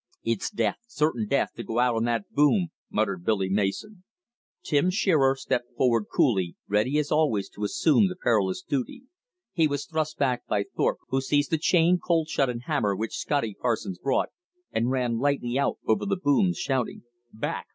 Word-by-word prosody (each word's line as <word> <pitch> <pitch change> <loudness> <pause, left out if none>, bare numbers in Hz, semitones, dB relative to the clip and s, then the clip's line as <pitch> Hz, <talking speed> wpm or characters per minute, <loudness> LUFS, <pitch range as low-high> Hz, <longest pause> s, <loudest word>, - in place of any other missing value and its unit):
"It's 115 -3 -1
death, 205 - -1
certain 150 - 0
death, 140 +5 +1
to 120 - -5
go 115 - -4
out 125 0 +3
on 115 0 0
that 115 -3 -2
boom," 155 +5 +3 0.2
muttered 100 -4 -1
Billy 100 -2 +1
Mason. 105 - -2 0.6
Tim 150 +5 +2
Shearer 155 -8 +3
stepped 125 -2 -3
forward 115 -4 +2
coolly, 95 -9 +1
ready 110 +8 +1
as 150 0 -1
always 130 -11 +1
to 105 - -8
assume 145 - +3
the 185 - -5
perilous 105 - 0
duty. 140 - -3 0.5
He 165 -3 +3
was 145 -1 -3
thrust 155 -1 -2
back 125 -3 0
by 100 - +1
Thorpe, - - +1
who 135 0 +1
seized 145 +1 +1
the 160 - +2
chain, 175 +1 +3
cold 165 -2 0
shut 135 -4 +1
and 120 -1 -4
hammer 125 -9 0
which 110 +3 -4
Scotty 140 -8 -1
Parsons 110 -7 -1
brought, 135 - 0 0.4
and 115 +2 0
ran 125 -3 0
lightly 135 -2 0
out 140 - 0
over 110 - +1
the 195 -1 0
booms, 180 +3 +2
shouting, 130 -4 -2 0.3
"Back! 110 - -4
130 Hz, 180 wpm, -26 LUFS, 115-155 Hz, 0.6 s, out